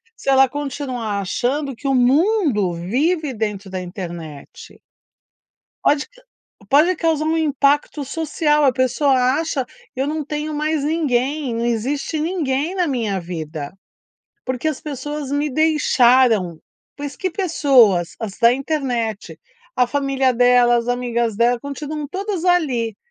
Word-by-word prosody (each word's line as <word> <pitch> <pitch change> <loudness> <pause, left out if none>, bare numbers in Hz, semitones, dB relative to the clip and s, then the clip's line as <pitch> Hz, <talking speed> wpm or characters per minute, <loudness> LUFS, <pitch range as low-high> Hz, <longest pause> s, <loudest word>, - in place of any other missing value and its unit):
se 275 - -4
ela 270 0 +6
continuar 255 -6 -4
achando 265 +8 -2
que 275 +4 -6
o 270 - +2
mundo 265 - +2
vive 280 - -1
dentro 210 -3 -4
da 185 -1 -3
internet. 175 -5 -9 1.1
Pode 290 0 +2
ca - - -22 0.5
pode 310 +7 +5
causar 320 -2 0
um 320 +1 +1
impacto 290 -1 +1
social, 300 +1 0
a 270 - +5
pessoa 265 +2 +2 0.3
acha. 320 -5 -2 0.3
"Eu 265 +2 -1
não 305 0 -3
tenho 300 +1 -4
mais 305 0 -1
ninguém, 285 -4 0
não 230 - -1
existe 270 +7 -1
ninguém 315 -1 -1
na 360 -2 +1
minha 230 -9 -1
vida, 160 -3 -6 0.7
porque 255 +3 -3
as 305 - -3
pessoas 295 0 -5
me 290 +1 0
deixaram." 255 - +3 0.4
Mas 285 -1 -6
que 375 -1 -2
pessoas? 265 - +3
As 210 -4 -6
da 235 0 +6
internet. 245 - -3 0.4
A 250 -1 +3
família 270 -1 +1
dela, 245 0 +4
as 235 0 -2
amigas 240 -3 -1
dela, 240 +1 +2
continuam 290 +1 -5
todas 385 +1 -4
ali, 265 - +1
270 Hz, 135 wpm, -20 LUFS, 235-300 Hz, 1.1 s, ela